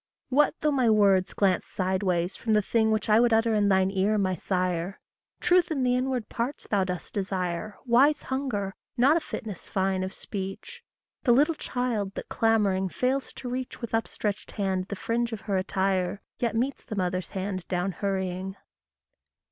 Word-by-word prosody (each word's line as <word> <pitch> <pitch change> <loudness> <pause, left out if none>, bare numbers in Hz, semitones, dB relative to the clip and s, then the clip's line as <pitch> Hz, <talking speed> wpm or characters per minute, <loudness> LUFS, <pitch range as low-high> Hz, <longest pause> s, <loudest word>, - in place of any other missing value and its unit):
WHAT 290 +4 +3
though 300 - +2
my 260 -5 +3
words 200 -3 +4
glance 190 -3 +2
sideways 185 -1 0
from 225 - -1
the 210 - +5
thing 220 +2 +2
Which 215 0 0
I 215 0 +5
would 240 0 +4
utter 225 0 +3
in 205 -1 +3
thine 190 0 +3
ear, 200 +2 +2
my 190 -2 +1
sire! 180 0 -1 0.4
Truth 355 0 +3
in 285 -5 0
the 250 0 +3
inward 255 -2 -1
parts 245 +5 -3
thou 200 -2 +1
dost 180 -2 -5
desire 190 0 -2
Wise 265 +5 +4
hunger, 245 -8 -2 0.2
not 270 +6 +5
a - - +4
fitness 215 - -7
fine 190 -1 0
of 190 - -3
speech: 195 - -6 0.4
The 240 - +4
little 295 +6 +4
child 240 -9 -2
that - - -6
clamouring 205 -4 +2
fails 260 +7 -1
to 255 - -8
reach 255 +1 -4
With 235 -2 -6
upstretched 215 -2 -2
hand 190 -3 -1
the 200 - -4
fringe 230 +3 -1
of 215 - -5
her 200 -3 -2
attire, 190 0 0 0.2
Yet 235 -2 0
meets 260 +4 -1
the 215 - -6
mother's 185 -2 -1
hand 190 -2 -3
down 180 +1 -1
hurrying. 190 0 -2
205 Hz, 175 wpm, -27 LUFS, 190-240 Hz, 0.4 s, the